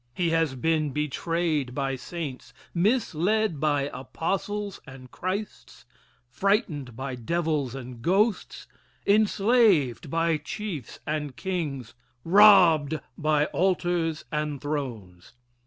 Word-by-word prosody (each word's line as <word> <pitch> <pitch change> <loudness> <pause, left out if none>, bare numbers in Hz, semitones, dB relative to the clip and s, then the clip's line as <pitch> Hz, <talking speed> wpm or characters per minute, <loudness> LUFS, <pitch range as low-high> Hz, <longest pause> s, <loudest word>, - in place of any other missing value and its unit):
He 170 -2 0
has 165 -4 +1
been 155 +2 +1
betrayed 150 -1 -1
by 135 -1 -1
saints, 145 -1 -7 0.2
misled 200 - +1
by 145 -2 +1
apostles 195 +8 -3
and 130 -2 -12
Christs, 195 +3 -5 0.4
frightened 150 - -1
by 130 +2 -5
devils 150 +1 -1
and 125 -3 -8
ghosts 195 - 0 0.4
enslaved 200 - +3
by 165 +1 +1
chiefs 155 - -6
and 150 -3 -3
kings 145 - -4 0.3
robbed 165 -6 +6 0.2
by 150 -1 +2
altars 175 -3 0
and 150 -2 -2
thrones. 120 -12 -5
155 Hz, 100 wpm, -26 LUFS, 135-185 Hz, 0.4 s, robbed